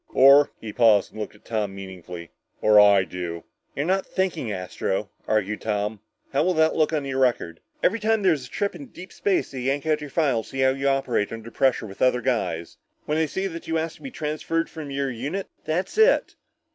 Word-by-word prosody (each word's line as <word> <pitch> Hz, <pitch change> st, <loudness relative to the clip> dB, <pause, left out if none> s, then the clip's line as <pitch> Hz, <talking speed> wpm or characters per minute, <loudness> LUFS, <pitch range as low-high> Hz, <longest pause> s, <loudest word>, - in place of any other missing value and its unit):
Or 140 Hz, +2 st, +7 dB
" -, -, -42 dB
he 110 Hz, -2 st, -7 dB
paused 110 Hz, -5 st, +4 dB
and 110 Hz, -, -7 dB
looked 105 Hz, -, -6 dB
at 105 Hz, -, -22 dB
Tom 105 Hz, -4 st, -2 dB
meaningfully, 90 Hz, -3 st, -9 dB, 0.3 s
"or 105 Hz, -1 st, +6 dB
I 100 Hz, -2 st, +7 dB
do." 90 Hz, -2 st, -6 dB, 0.3 s
"You're 140 Hz, -, -1 dB
not 190 Hz, +2 st, +1 dB
thinking, 175 Hz, -, -1 dB
Astro," 95 Hz, +1 st, -3 dB, 0.2 s
argued 105 Hz, -1 st, 0 dB
Tom. 105 Hz, 0 st, -2 dB, 0.3 s
"How 135 Hz, -, +3 dB
will 180 Hz, +1 st, +1 dB
that 160 Hz, 0 st, +3 dB
look 155 Hz, -1 st, +2 dB
on 150 Hz, -3 st, -1 dB
your 135 Hz, -1 st, -2 dB
record? 120 Hz, -10 st, +1 dB, 0.2 s
Every 230 Hz, +5 st, +3 dB
time 220 Hz, 0 st, +1 dB
there's 155 Hz, -9 st, +2 dB
a -, -, -20 dB
trip 200 Hz, +7 st, -2 dB
into 275 Hz, -3 st, -10 dB
deep 185 Hz, +2 st, -11 dB
space, 200 Hz, -2 st, 0 dB
they 135 Hz, -, -6 dB
yank 135 Hz, +3 st, -1 dB
out 155 Hz, -1 st, +1 dB
your 150 Hz, -, -6 dB
file 140 Hz, -7 st, +1 dB
to -, -, -14 dB
see 135 Hz, -, -3 dB
how 130 Hz, 0 st, +5 dB
you 135 Hz, +1 st, -2 dB
operate 135 Hz, -6 st, +1 dB
under 115 Hz, 0 st, -8 dB
pressure 130 Hz, -3 st, +1 dB
with 95 Hz, -2 st, -11 dB
other 125 Hz, -1 st, +3 dB
guys. 90 Hz, -10 st, -2 dB, 0.3 s
When 150 Hz, +1 st, 0 dB
they 160 Hz, -, +2 dB
see 190 Hz, +6 st, -3 dB
that 165 Hz, -3 st, -6 dB
you 165 Hz, -, 0 dB
asked 160 Hz, 0 st, -3 dB
for -, -, -8 dB
a -, -, -6 dB
transfer 160 Hz, -, -2 dB
from 155 Hz, -3 st, -8 dB
your 140 Hz, -1 st, -2 dB
unit, 145 Hz, +12 st, -4 dB, 0.2 s
that's 175 Hz, +4 st, -2 dB
it!" 475 Hz, +3 st, +4 dB
135 Hz, 220 wpm, -24 LUFS, 105-160 Hz, 0.3 s, Or